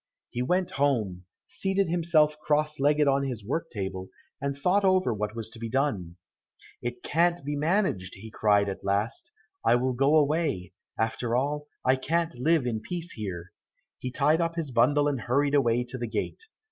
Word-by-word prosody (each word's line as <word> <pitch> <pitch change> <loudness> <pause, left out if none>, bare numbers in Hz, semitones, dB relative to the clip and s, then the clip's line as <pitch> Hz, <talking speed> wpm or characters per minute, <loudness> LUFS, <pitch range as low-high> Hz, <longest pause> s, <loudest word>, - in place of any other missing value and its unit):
He 120 - -3
went 180 +7 +1
home, 105 -11 +1 0.2
seated 195 0 0
himself 160 -3 +3
cross 150 0 0
legged 145 +1 +3
on 140 0 +3
his 120 -6 -4
work 150 +9 -2
table, 95 -3 -5 0.3
and 140 0 -2
thought 180 +8 +2
over 185 -9 +3
what 105 +1 -3
was 115 -2 -4
to 115 - -11
be 115 0 -4
done. 110 - -1 0.7
"It 120 0 -5
can't 170 -1 +1
be 145 0 -2
managed," 150 - 0 0.2
cried 105 -1 +3
he 100 - -2
at 95 - -8
last, 105 - -1 0.3
"I - - +5
will 130 +1 +1
go 135 +5 +3
away; 150 - +1 0.2
after 115 +1 -1
all 145 +3 -1 0.2
I 130 +1 +4
can't 165 +5 0
live 150 +3 +2
in 115 -3 -1
peace 175 +3 -5
here." 90 -5 -6 0.5
He 130 - -4
tied 150 +5 +2
up 165 0 -1
his 160 -5 -3
bundle 145 +5 +3
and 140 -4 -1
hurried 140 +5 +1
away 125 -4 +3
to 125 +1 -7
the 120 - -2
gate. 110 - -4
135 Hz, 180 wpm, -27 LUFS, 115-155 Hz, 0.7 s, I